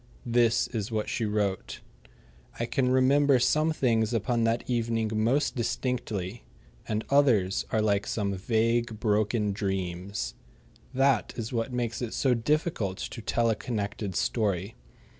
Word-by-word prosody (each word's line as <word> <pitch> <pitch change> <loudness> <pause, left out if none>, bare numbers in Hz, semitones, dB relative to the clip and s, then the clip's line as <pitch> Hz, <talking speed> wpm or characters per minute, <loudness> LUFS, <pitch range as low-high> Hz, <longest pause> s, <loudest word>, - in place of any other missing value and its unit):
This 120 -1 +3
is 110 -1 -4
what 110 -1 -1
she 115 - -1
wrote: 105 -3 -2 0.8
I 115 - 0
can 125 +1 0
remember 135 +2 +4
some 155 +6 +2
things 115 -6 +1
upon 115 +1 +1
that 115 +1 0
evening 115 -2 0
most 115 +7 +1
distinctly, 120 -4 -2 0.4
and 110 0 -2
others 120 -10 +3
are 110 - +1
like 100 -1 +1
some 100 -3 -1
vague, 115 +3 0
broken 105 -1 +1
dreams. 95 - -3 0.6
That 135 -3 +2
is 115 +1 -4
what 115 +1 -1
makes 120 -2 -2
it 120 -3 -3
so 130 -2 +2
difficult 120 - 0
to 115 - -6
tell 115 +2 +1
a - - 0
connected 105 -4 -4
story. 100 -2 0
115 Hz, 140 wpm, -28 LUFS, 105-125 Hz, 0.8 s, remember